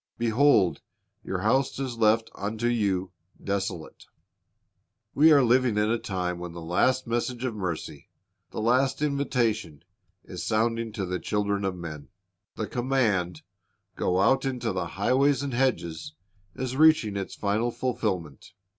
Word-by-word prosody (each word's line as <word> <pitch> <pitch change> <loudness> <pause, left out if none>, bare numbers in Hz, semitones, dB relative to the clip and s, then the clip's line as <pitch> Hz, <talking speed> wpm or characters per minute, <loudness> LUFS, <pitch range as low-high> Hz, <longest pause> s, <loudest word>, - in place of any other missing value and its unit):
Behold, 115 - +3 0.4
your 95 -1 -3
house 130 +6 +1
is 130 -3 -3
left 115 0 +2
unto 110 +3 -4
you 100 -6 0 0.3
desolate."^ 95 -4 -4 1.1
We 155 +3 +6
are 140 -3 +6
living 125 -2 +3
in 105 +1 +2
a 115 - +1
time 90 -4 -3
when 90 -1 -7
the 85 - -8
last 125 +10 +1
message 120 +1 -2
of 125 - -2
mercy, 90 -6 -5 0.4
the - - -5
last 130 +5 +2
invitation, 120 - -1 0.4
is - - -7
sounding 115 +1 0
to 100 -4 -3
the 90 0 -3
children 100 -1 -1
of 95 -1 -1
men. 80 -5 -8 0.5
The - - -3
command, 115 -9 0 0.5
"Go 90 0 0
out 135 +7 +3
into 125 -4 -2
the 95 - -2
highways 135 +6 +2
and 140 -3 -3
hedges," 120 - -1 0.4
is 130 0 -4
reaching 155 -9 +4
its 100 -1 -4
final 105 +4 0
fulfilment. 95 - -3
110 Hz, 140 wpm, -26 LUFS, 95-130 Hz, 1.1 s, We